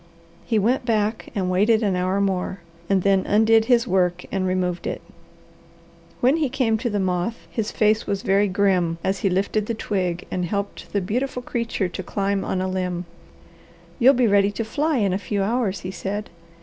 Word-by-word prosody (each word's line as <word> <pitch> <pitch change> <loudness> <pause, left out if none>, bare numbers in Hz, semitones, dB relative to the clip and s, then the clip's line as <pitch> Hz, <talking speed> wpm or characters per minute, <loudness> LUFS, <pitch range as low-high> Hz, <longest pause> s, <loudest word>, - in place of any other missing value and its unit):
He 225 - +1
went 240 +6 +2
back 220 -2 -1
and 190 -3 0
waited 215 +4 +3
an 200 -3 +1
hour 185 +2 0
more, 190 -1 -1 0.3
and 195 -2 +2
then 195 -1 +3
undid 220 +1 +4
his 240 -1 +3
work 180 -4 +1
and 190 -1 0
removed 180 -1 -1
it. - - -3 1.2
When 260 +6 +4
he 305 -4 0
came 240 -4 +1
to 240 +1 -1
the 205 -2 -1
moth 185 +4 -1
his 215 -2 -2
face 215 0 +2
was 200 -1 -2
very 200 -1 +3
grim 185 -3 +1
as 195 +1 0
he 195 - +1
lifted 200 +3 0
the 230 - -2
twig 185 -5 -2
and 180 -1 -1
helped 200 +3 -4
the 200 - 0
beautiful 250 +6 -2
creature 230 -5 -2
to 180 - -6
climb 195 +1 -1
on 185 - -2
a - - -1
limb. 180 -1 -2 0.9
"You'll 265 +3 +6
be 250 0 +3
ready 200 -2 +4
to 225 - -3
fly 295 +6 0
in 200 -5 +1
a 190 - -1
few 200 0 -2
hours," 215 -2 -1
he 185 - -5
said. 205 +1 -4
200 Hz, 190 wpm, -23 LUFS, 185-225 Hz, 1.2 s, You'll